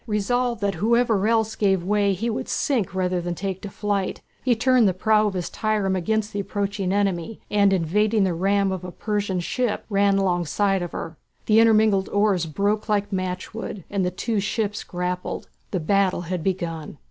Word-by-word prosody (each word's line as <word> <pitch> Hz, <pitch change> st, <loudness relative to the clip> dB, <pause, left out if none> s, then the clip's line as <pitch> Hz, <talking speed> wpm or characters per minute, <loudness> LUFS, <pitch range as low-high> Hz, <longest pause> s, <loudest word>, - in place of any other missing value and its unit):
Resolved 235 Hz, +2 st, 0 dB
that 200 Hz, -1 st, +1 dB
whoever 225 Hz, -2 st, +3 dB
else 220 Hz, -1 st, +2 dB
gave 195 Hz, -4 st, +2 dB
way 200 Hz, +1 st, +2 dB
he 210 Hz, +6 st, -3 dB
would 225 Hz, -, -3 dB
sink 230 Hz, -10 st, 0 dB
rather 180 Hz, -1 st, 0 dB
than 175 Hz, 0 st, -3 dB
take 190 Hz, +1 st, -4 dB
to 200 Hz, -, -6 dB
flight, 200 Hz, -1 st, -2 dB, 0.2 s
he 245 Hz, -2 st, +3 dB
turned 245 Hz, -1 st, +4 dB
the 185 Hz, -, +1 dB
prow 215 Hz, +2 st, +3 dB
of 200 Hz, -, -3 dB
his 180 Hz, -2 st, -2 dB
trireme 210 Hz, -3 st, 0 dB
against 215 Hz, +4 st, -1 dB
the 205 Hz, -, -2 dB
approaching 200 Hz, -1 st, -2 dB
enemy, 200 Hz, 0 st, -1 dB
and 200 Hz, -1 st, +4 dB
evading 205 Hz, +4 st, +2 dB
the 185 Hz, -2 st, +1 dB
ram 195 Hz, +3 st, +1 dB
of 185 Hz, -1 st, -4 dB
a 180 Hz, -, -6 dB
Persian 205 Hz, -2 st, -2 dB
ship 235 Hz, +6 st, -1 dB
ran 200 Hz, 0 st, +3 dB
alongside 190 Hz, +1 st, +1 dB
of 175 Hz, -, -5 dB
her. 165 Hz, -1 st, -6 dB, 0.3 s
The 220 Hz, 0 st, +5 dB
intermingled 215 Hz, -3 st, +4 dB
oars 205 Hz, -5 st, +2 dB
broke 205 Hz, +7 st, -1 dB
like 205 Hz, -1 st, 0 dB
matchwood, 185 Hz, +2 st, -4 dB
and 200 Hz, -2 st, 0 dB
the 180 Hz, -, +1 dB
two 210 Hz, +4 st, -2 dB
ships 205 Hz, +1 st, -2 dB
grappled. 180 Hz, 0 st, -4 dB, 0.2 s
The 185 Hz, -, -1 dB
battle 190 Hz, +2 st, +1 dB
had 175 Hz, -1 st, -4 dB
begun. 170 Hz, -6 st, -3 dB
200 Hz, 180 wpm, -24 LUFS, 185-215 Hz, 0.3 s, The